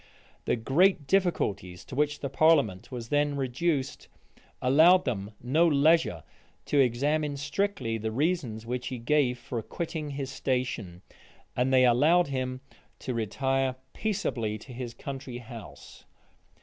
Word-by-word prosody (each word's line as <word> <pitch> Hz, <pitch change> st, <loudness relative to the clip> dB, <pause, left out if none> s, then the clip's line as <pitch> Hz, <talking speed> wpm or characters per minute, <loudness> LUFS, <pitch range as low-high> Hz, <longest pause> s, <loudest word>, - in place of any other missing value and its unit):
The -, -, +2 dB
great 150 Hz, -, +2 dB
difficulties 120 Hz, -, 0 dB
to -, -, -11 dB
which 145 Hz, +2 st, 0 dB
the 140 Hz, -, -3 dB
parliament 140 Hz, -, +3 dB
was 120 Hz, -2 st, -6 dB
then 145 Hz, 0 st, +1 dB
reduced, 135 Hz, +2 st, -1 dB, 0.5 s
allowed 160 Hz, +8 st, +5 dB
them 105 Hz, -3 st, -3 dB
no 155 Hz, +8 st, +3 dB
leisure 150 Hz, -, +3 dB, 0.4 s
to 145 Hz, -, +1 dB
examine 140 Hz, +4 st, +1 dB
strictly 145 Hz, -, -2 dB
the 110 Hz, +1 st, -3 dB
reasons 130 Hz, -5 st, -1 dB
which 125 Hz, +1 st, -3 dB
he 130 Hz, -, -4 dB
gave 125 Hz, +1 st, +1 dB
for 120 Hz, -1 st, -5 dB
quitting 160 Hz, +5 st, -5 dB
his 135 Hz, -2 st, -5 dB
station; 125 Hz, -10 st, -3 dB, 0.5 s
and 125 Hz, +2 st, +1 dB
they 130 Hz, -1 st, +5 dB
allowed 150 Hz, +7 st, +4 dB
him 130 Hz, -1 st, -3 dB, 0.4 s
to 130 Hz, -, -4 dB
retire 130 Hz, +4 st, 0 dB, 0.2 s
peaceably 125 Hz, -, -2 dB
to 125 Hz, +4 st, -12 dB
his 120 Hz, -1 st, -6 dB
country 135 Hz, -1 st, -7 dB
house. 120 Hz, -2 st, -11 dB
130 Hz, 135 wpm, -28 LUFS, 120-150 Hz, 0.5 s, allowed